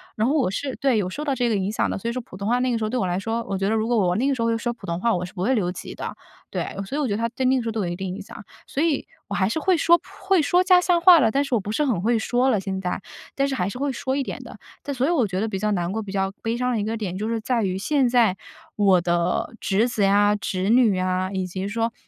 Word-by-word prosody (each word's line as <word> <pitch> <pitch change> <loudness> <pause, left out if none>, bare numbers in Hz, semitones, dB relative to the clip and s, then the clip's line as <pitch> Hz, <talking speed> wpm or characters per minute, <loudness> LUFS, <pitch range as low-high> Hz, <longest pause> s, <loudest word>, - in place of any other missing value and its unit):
然 220 +3 +1
后 290 - +1
我 265 -10 +2
是 270 +5 -3
对， 270 -4 +2
有 185 -3 0
受 295 +10 -5
到 285 - +1
这 245 -2 0
个 215 - +1
影 195 +1 -1
响 - - 0
的。 - - -2
所 215 +4 -5
以 - - -1
说 255 +1 -3
普 185 - -12
通 200 - -4
话 245 +2 +2
那 255 0 +1
个 230 - +1
时 225 - -3
候 215 - -1
对 250 +1 -1
我 185 - 0
来 175 +1 -1
说， 225 +3 -2
我 195 - -1
觉 195 +1 0
得 220 - +1
如 220 0 0
果 240 - +2
我 180 -4 +2
那 255 +6 +1
个 275 - +2
时 235 - -4
候 - - +1
会 230 - +1
说 240 +1 -2
普 - - -13
通 170 +1 -3
话， 230 +2 +2
我 180 - -2
是 180 - -11
不 180 - -6
会 255 +6 +2
留 180 -5 0
级 - - -8
的。 - - -6 0.4
对， - - -3
所 270 - -5
以 300 - 0
我 270 - 0
觉 205 - -1
得 - - -2
它 230 +1 -1
对 255 +2 -3
那 260 +1 +4
个 255 - +1
时 - - -5
候 - - 0
都 220 -1 -2
有 - - -2
一 175 - -3
定 190 -1 -4
影 205 - -7
响， 205 - -11 0.2
所 285 - -1
以 320 -4 0 0.2
我 205 - -6
还 190 - +2
是 320 - -2
会 370 +1 +2
说 340 +3 +5
普 - - -48 0.2
会 380 -4 +4
说 350 +5 +3
家 365 -1 +6
乡 355 -1 +2
话 350 -2 +8
了， 225 -4 +3
但 280 +1 +2
是 255 - 0
我 - - +2
不 205 +2 -5
是 295 +6 +1
很 220 -10 0
会 230 +2 +2
说 250 +4 +1
了 215 -6 +2
现 190 0 -4
在， 180 +1 -3 0.3
但 275 0 +1
是 270 - -2
还 185 -3 -1
是 250 - -7
会 280 0 -1
说 260 +2 -2
一 280 - 0
点 - - -6
的。 - - -11 0.3
但 285 - -3
所 260 +2 0
以 - - +1
我 300 -9 +2
觉 185 -2 -3
得 220 - 0
比 200 -3 -3
较 210 +1 0
难 175 -3 -1
过、 220 +2 -2
比 200 - -8
较 195 0 -1
悲 225 +1 -1
伤 250 0 0
的 220 - 0
一 - - -1
个 220 +2 -2
点 190 -4 -4
就 215 +3 -2
是 230 - -1
在 230 0 0
于 185 -1 -1
现 265 +4 +1
在 230 -6 +3 0.4
我 195 -3 +4
的 175 +3 0
侄 210 +5 +2
子 220 -4 -1
呀、 205 +1 +4
侄 190 -1 -2
女 225 -6 +4
啊， 185 +1 -1
以 190 -1 -2
及 185 +2 -4
说， 230 +1 -1
225 Hz, 370 characters per minute, -23 LUFS, 195-255 Hz, 0.4 s, 话